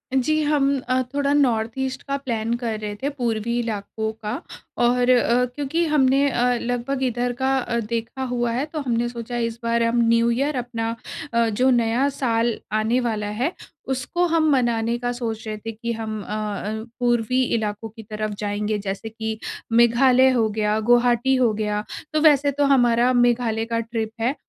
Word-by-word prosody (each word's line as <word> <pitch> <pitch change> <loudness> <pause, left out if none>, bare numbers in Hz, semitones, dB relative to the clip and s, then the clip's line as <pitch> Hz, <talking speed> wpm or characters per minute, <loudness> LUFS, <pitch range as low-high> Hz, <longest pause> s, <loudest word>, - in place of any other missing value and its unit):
जी, 310 +4 +2
हम 280 -2 +2
अ, 255 0 +3
थोड़ा 280 0 +1
north 235 -6 +2
east 265 0 -3
का 275 - -2
प्लान 235 -4 -2
कर 225 -3 -2
रहे 210 -1 -5
थे, 280 - 0
पूर्वीं 235 -4 -2
इलाकों 220 -1 -3
का 210 - -2 0.5
और 245 +1 +3
अ, 250 0 +4
क्योंकि 295 +4 -1
हमने 280 -2 +3
अ, 245 -1 +2
लगभग 245 +3 -2
इधर 245 0 0
का 260 -3 +1
देखा 235 +3 -3
हुआ 240 -1 0
है, 250 +5 -1
तो 310 0 -6
हमने 240 -4 0
सोचा 240 0 -5
इस 230 -1 -2
बार 230 0 +1
हम 230 +1 +1
न्यू 230 0 +3
ईयर 275 +5 0
अपना 230 -2 -3 0.4
अ, 235 0 +3
जो 250 +5 +2
नया 240 +2 +2
साल 235 -4 0 0.2
आने 215 +3 +1
वाला 220 -4 -2
है, 310 +8 +1 0.4
उसको 275 +7 0
मनाने 240 -6 +2
का 245 0 -2
सोच 225 -2 -4
रहे 215 0 -4
थे 225 +2 -6
कि 230 +2 -5
हम 220 -1 -4
अ 210 - -6
अ, 215 0 -3 0.2
पूर्वीं 245 +1 +2
इलाकों 215 0 -4
की 225 +1 -12
तरफ 215 0 -4
जाएँगे। 210 +1 -1
जैसे 200 +2 -5
कि 220 0 -4 0.3
मेघालय 245 +3 +5
हो 235 -4 +2
गया, 210 0 0
गुवाहाटी 240 +3 +3
हो 245 -4 +3
गया। 210 0 -2 0.3
तो 310 - +2
वैसे 290 -2 +5
तो 285 +1 +1
हमारा 240 0 +3
मेघालय 240 -2 +2
का 230 0 -1
ट्रिप 225 -1 -3
है 250 +5 +1
235 Hz, 175 wpm, -23 LUFS, 225-260 Hz, 0.5 s, मेघालय